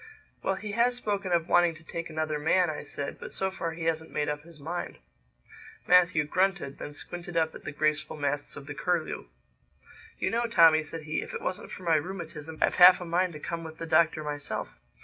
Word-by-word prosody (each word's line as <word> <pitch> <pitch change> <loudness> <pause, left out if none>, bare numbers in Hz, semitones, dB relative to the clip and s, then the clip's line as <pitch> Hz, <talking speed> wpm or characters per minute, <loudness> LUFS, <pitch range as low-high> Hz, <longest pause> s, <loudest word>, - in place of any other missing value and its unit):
"Well, 195 - 0
he 205 +2 -6
has 240 +3 +2
spoken 200 -6 -2
of 170 -1 +2
wanting 175 -2 +4
to 155 - -15
take 165 +1 -5
another 155 -1 -2
man," 175 +3 +3
I 150 - -5
said; 145 -1 -6
"but - - -8
so 190 0 -1
far 165 -3 -3
he 165 +1 -6
hasn't 160 -1 -1
made 150 0 -1
up 150 0 -3
his 165 0 -16
mind." 170 +5 -5 0.9
Matthew 180 -3 +5
grunted; 180 -2 0
then 145 - -7
squinted 175 +3 -7
up 160 -1 +2
at - - -11
the - - -3
graceful 155 +1 0
masts 145 0 -2
of 140 - -9
the 145 - -6
Curlew. 170 - -2 0.9
"You - - -1
know, 235 +1 +1
Tommy," 165 -8 +6
said 155 +1 -7
he, 155 +1 -2
"if - - -7
it 460 - -4
wasn't - - -3
for 185 - -9
my 165 -2 +4
rheumatism 160 -2 -6
I've - - +2
half 180 +1 +10
a 180 - -6
mind 175 +1 +1
to 150 - -8
come 165 +2 -4
with 160 -1 -9
the 165 - -5
Doctor 160 -1 +3
myself. 145 -1 -4
165 Hz, 215 wpm, -28 LUFS, 155-180 Hz, 0.9 s, half